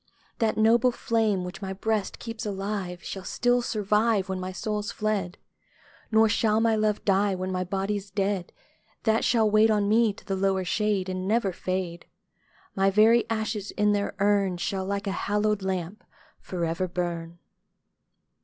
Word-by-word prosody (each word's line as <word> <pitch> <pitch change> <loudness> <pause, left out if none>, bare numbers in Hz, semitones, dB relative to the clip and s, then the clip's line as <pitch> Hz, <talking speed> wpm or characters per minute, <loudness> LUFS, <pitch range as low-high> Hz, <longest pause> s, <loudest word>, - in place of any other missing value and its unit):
That 220 -2 +1
noble 230 +3 +4
flame, 220 -5 0
which 180 +3 -7
my 190 -1 -4
Ijreast 215 0 -1
keeps 225 -1 -6
alive. 195 -3 -4
Shall 195 - -6
still 245 +4 +1
survive 210 -1 +1
Wlien 190 -1 -4
my 185 0 -4
soul's 210 +3 -3
fled; 205 -4 -2 0.7
Nor 220 0 +5
shall 215 0 +2
my 225 0 +3
love 215 -1 0
die, 195 0 +2
when 185 0 -3
ray 185 0 -1
Ijody's 195 +2 -2
dead; 195 -2 -1 0.5
That 220 0 +2
shall 225 -3 +3
wait 215 +1 +4
on 210 -2 +2
me 220 +1 +4
to - - -16
the 195 - -2
lower 190 -1 0
shade, 210 -2 0
And 185 0 -3
never 210 -3 +1
fade: 185 -1 -4 0.7
My 195 0 +3
very 220 +4 +4
ashes 220 -2 -2
in 210 0 +1
their 205 0 -1
urn 200 -2 +2
Shall, 190 +1 -2
like 200 0 -2
a 195 - -1
hallowed 210 +1 0
lamp, 190 +1 -3 0.4
for 175 -2 -3
ever 165 +3 -1
burn. 170 -1 -4
200 Hz, 165 wpm, -26 LUFS, 190-215 Hz, 0.7 s, Nor